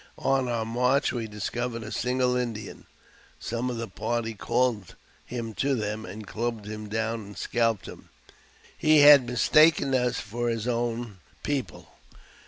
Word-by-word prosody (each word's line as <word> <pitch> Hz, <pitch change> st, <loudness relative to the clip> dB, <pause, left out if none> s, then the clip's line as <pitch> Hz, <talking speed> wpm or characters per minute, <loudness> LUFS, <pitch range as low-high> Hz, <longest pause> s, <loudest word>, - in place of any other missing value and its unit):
On 135 Hz, -2 st, +1 dB
om' 115 Hz, -2 st, -2 dB
march 125 Hz, +4 st, +2 dB
we 115 Hz, -3 st, -3 dB
discovered 115 Hz, +3 st, -4 dB
a 110 Hz, -, -7 dB
single 125 Hz, 0 st, 0 dB
Indian. 120 Hz, -4 st, -4 dB, 0.5 s
Some 120 Hz, +2 st, -3 dB
of 120 Hz, -, -4 dB
the 115 Hz, 0 st, -4 dB
party 115 Hz, +3 st, -3 dB
called 110 Hz, -2 st, -1 dB, 0.3 s
him 115 Hz, -2 st, -5 dB
to 135 Hz, +5 st, 0 dB
them, 105 Hz, -2 st, -3 dB
and 105 Hz, +3 st, -8 dB
clubbed 115 Hz, 0 st, -4 dB
him 105 Hz, 0 st, -7 dB
down 110 Hz, +1 st, -2 dB
and 100 Hz, 0 st, -12 dB
scalped 115 Hz, -4 st, 0 dB
him. -, -, -11 dB, 0.7 s
He 155 Hz, -1 st, +5 dB
had 145 Hz, -3 st, +8 dB
mistaken 140 Hz, +3 st, +4 dB
us 125 Hz, -2 st, +1 dB
for 120 Hz, +3 st, -3 dB
his 115 Hz, 0 st, -2 dB
own 120 Hz, -3 st, -2 dB, 0.2 s
people. 130 Hz, -, -3 dB
115 Hz, 150 wpm, -27 LUFS, 110-125 Hz, 0.7 s, had